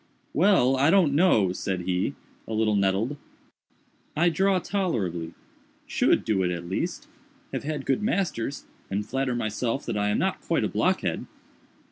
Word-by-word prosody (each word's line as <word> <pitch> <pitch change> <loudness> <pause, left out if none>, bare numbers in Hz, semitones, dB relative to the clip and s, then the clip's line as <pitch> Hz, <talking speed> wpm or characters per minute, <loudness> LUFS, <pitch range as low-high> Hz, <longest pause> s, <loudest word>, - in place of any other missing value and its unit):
"Well, 155 -7 +4
I 140 +3 +4
don't 175 -6 +4
know," 140 - +4
said 95 -1 -3
he, 90 +1 -1 0.3
a 110 - -4
little 110 -1 +2
nettled, 100 +8 +1 1.0
"I 170 +3 +4
draw 190 +4 +2
tolerably—should 100 - -2
do 105 -4 +1
it 90 - +1
at 85 -1 -4
least—have 275 - -6
had 150 -2 -3
good 135 +10 +1
masters, 160 - -1 0.2
and 100 +2 -2
flatter 130 +2 -1
myself 115 +3 -2
that - - -2
I 105 0 +1
am 105 - +1
not - - -1
quite - - 0
a - - +2
blockhead." - - 0
130 Hz, 145 wpm, -26 LUFS, -, 1.0 s, Well